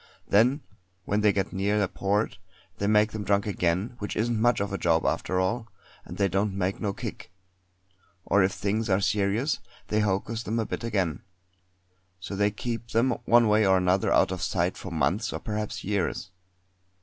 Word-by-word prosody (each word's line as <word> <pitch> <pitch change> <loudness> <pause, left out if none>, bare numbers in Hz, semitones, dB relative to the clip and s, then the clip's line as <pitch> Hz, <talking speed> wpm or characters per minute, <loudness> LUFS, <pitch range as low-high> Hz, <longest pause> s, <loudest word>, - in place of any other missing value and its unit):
Then 120 +8 +3 0.4
when 105 +1 0
they 105 -1 +5
get 95 -1 -2
near 100 +2 +1
a - - +1
port 100 +4 -1 0.4
they 100 - 0
make 105 0 +4
them 110 -1 -4
drunk 100 0 +1
again, 95 +3 -1
which 105 - -4
isn't 115 0 0
much 120 0 +3
of 100 0 -2
a - - -1
job 80 -1 +2
after 90 - 0
all, 110 +5 -1 0.4
and - - -9
they 100 - +3
don't 100 +1 -1
make 95 0 -1
no 105 -3 0
kick; - - -7 0.9
or 100 - +3
if 95 +1 +3
things 105 +3 -2
are 95 0 +3
serious 105 +7 +1 0.3
they 110 - +1
hocus 105 +2 -1
them 110 +1 -3
a 115 - 0
bit - - -5
again. 95 -9 -1 1.0
So 95 +2 -6
they 100 +1 +2
keep 115 +2 -5
them 115 +3 +2
one 120 0 +5
way 105 +1 +4
or 95 -1 +4
another 90 +1 +2
out - - +4
of 95 -2 -4
sight 90 +2 0
for 95 - -8
months 90 +7 0
or - - -4
perhaps 105 -1 -4
years. 95 -1 -2
100 Hz, 185 wpm, -27 LUFS, 95-110 Hz, 1.0 s, they